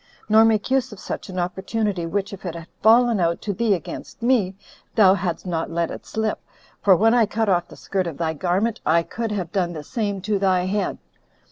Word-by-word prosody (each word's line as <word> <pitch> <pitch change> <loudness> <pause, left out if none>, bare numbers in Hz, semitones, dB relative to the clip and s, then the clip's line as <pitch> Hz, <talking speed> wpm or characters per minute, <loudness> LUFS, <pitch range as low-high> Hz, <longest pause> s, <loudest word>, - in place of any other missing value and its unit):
nor 220 +1 +6
make 225 +1 +2
use 260 -2 +2
of 210 - -10
such - - -6
an 185 - -6
opportunity, 190 +1 -2
which, 200 +3 -2
if 195 - -9
it 175 -3 -4
had 165 -1 -7 0.2
fallen 230 0 +5
out 170 -1 +1
to 205 - -3
thee 215 +1 +2
against 170 - -8
me, 225 -7 +2 0.4
thou 195 -4 +7
hadst 180 -3 -3
not 165 -3 -2
let 170 0 -1
it - - -9
slip, 220 -1 -2 0.4
for 195 -2 +6
when 225 +5 +4
I 235 -3 +4
cut 220 0 0
off 175 -2 +2
the - - -13
skirt 190 -2 -2
of 160 -4 -6
thy 160 -1 -1
garment, 185 +8 0
I 165 +1 +3
could 225 +5 -4
have 185 -5 -3
done 180 -4 0
the 155 -2 -6
same 205 - -2
to 205 +1 0
thy 185 -2 +2
head." 200 +2 -1
195 Hz, 220 wpm, -23 LUFS, 175-220 Hz, 0.4 s, thou